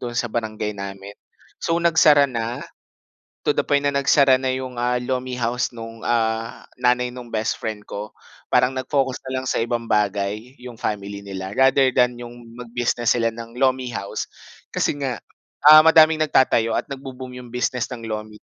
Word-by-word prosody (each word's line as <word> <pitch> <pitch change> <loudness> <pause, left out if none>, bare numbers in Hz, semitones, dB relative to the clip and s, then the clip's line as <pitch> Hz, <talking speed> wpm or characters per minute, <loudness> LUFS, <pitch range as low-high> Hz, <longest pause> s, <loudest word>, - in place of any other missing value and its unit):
do'n 120 -1 -5
sa 120 -3 -1
barangay 110 -2 -3
namin. 100 0 -8 0.5
So, 165 - 0
nagsara 160 -4 +5
na, 120 -2 -3 0.8
to - - +3
the - - +1
point 145 0 +1
na 140 - +1
nagsara 140 -1 +4
na 130 - 0
'yong, 130 0 -4
ah, 125 +1 0
lomi 125 0 -3
house 120 +1 -1
no'ng, 115 -1 -10
ah, 115 -1 -1
nanay 125 0 +1
no'ng 120 -2 -10
best 110 0 -2
friend 110 -2 -5
ko. 105 +1 -6 0.4
Parang 125 +1 +3
nag-focus 130 0 -1
na 130 0 -4
lang 130 - -6
sa 120 - 0
ibang 120 0 -2
bagay, 105 +4 -1
'yong 125 -1 -10
family 100 -1 -4
nila 95 0 -6
rather 135 -1 +4
than 125 -1 +2
'yong 120 0 -10 0.2
mag-business 120 -1 0
sila 115 -1 +1
ng 115 +1 -10
lomi 130 0 +1
house, 100 - -4 0.5
kasi 145 - 0
nga, 130 -4 -3 0.4
ah, 155 +1 +9
madaming 160 -1 +6
nagtatayo 115 -5 +2
at - - -3
nagbo-boom 130 -2 -8
'yong 125 -1 -12
business 125 0 -1
ng 115 - -10
lomi 110 -1 -6
125 Hz, 175 wpm, -22 LUFS, 115-130 Hz, 0.8 s, ah